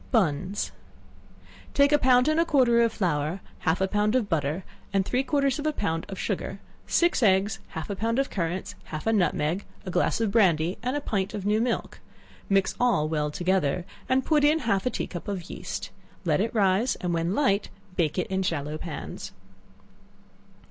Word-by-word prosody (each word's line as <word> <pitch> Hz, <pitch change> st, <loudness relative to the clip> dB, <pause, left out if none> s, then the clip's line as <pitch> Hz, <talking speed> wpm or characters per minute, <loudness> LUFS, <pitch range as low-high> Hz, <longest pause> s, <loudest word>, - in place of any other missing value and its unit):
Bunns. 190 Hz, -, 0 dB, 1.0 s
Take 280 Hz, +1 st, +5 dB
a 295 Hz, -, +5 dB
pound 250 Hz, 0 st, +5 dB
and 310 Hz, +1 st, +3 dB
a -, -, +5 dB
quarter 255 Hz, -7 st, +4 dB
of 230 Hz, -1 st, +3 dB
flour, 165 Hz, -3 st, -1 dB, 0.2 s
half 165 Hz, 0 st, +1 dB
a 190 Hz, -, +3 dB
pound 210 Hz, +3 st, +1 dB
of 245 Hz, -5 st, +2 dB
butter, 160 Hz, 0 st, -1 dB, 0.3 s
and 195 Hz, -1 st, +1 dB
three 250 Hz, +5 st, +1 dB
quarters 275 Hz, 0 st, +1 dB
of 300 Hz, -, -1 dB
a -, -, +3 dB
pound 165 Hz, -, -2 dB
of 195 Hz, -, -6 dB
sugar, -, -, -3 dB, 0.3 s
six 345 Hz, -5 st, +2 dB
eggs, 195 Hz, -1 st, +3 dB, 0.2 s
half 160 Hz, -, -4 dB
a 200 Hz, -, -3 dB
pound 230 Hz, +4 st, -1 dB
of 275 Hz, 0 st, 0 dB
currants, 175 Hz, 0 st, -2 dB
half 155 Hz, -1 st, -6 dB
a 225 Hz, -, +2 dB
nutmeg, 180 Hz, -2 st, +1 dB, 0.2 s
a 185 Hz, -, -4 dB
glass 180 Hz, +5 st, +1 dB
of 225 Hz, -3 st, +1 dB
brandy, 180 Hz, -5 st, +3 dB
and 255 Hz, +3 st, -1 dB
a 290 Hz, -, -1 dB
pint 200 Hz, -7 st, -2 dB
of 200 Hz, -2 st, -5 dB
new 210 Hz, +2 st, +2 dB
milk; 240 Hz, -1 st, -2 dB, 0.5 s
mix 195 Hz, -1 st, +3 dB
all 220 Hz, -11 st, +3 dB
well 150 Hz, -1 st, 0 dB
together, 175 Hz, 0 st, 0 dB, 0.2 s
and 260 Hz, 0 st, +2 dB
put 300 Hz, -2 st, +3 dB
in 300 Hz, +2 st, +5 dB
half 200 Hz, +1 st, +1 dB
a -, -, +4 dB
tea -, -, -3 dB
cup 175 Hz, -, -7 dB
of 195 Hz, -3 st, -4 dB
yeast; -, -, -5 dB, 0.3 s
let -, -, +2 dB
it 230 Hz, -, 0 dB
rise, 200 Hz, +4 st, +3 dB
and 180 Hz, -1 st, -2 dB
when 170 Hz, +3 st, 0 dB
light, 210 Hz, -8 st, +2 dB, 0.3 s
bake 160 Hz, -2 st, 0 dB
it 180 Hz, -, +1 dB
in 190 Hz, 0 st, -1 dB
shallow 155 Hz, -4 st, -2 dB
pans. 165 Hz, -2 st, -6 dB
195 Hz, 190 wpm, -26 LUFS, 175-245 Hz, 1.0 s, Take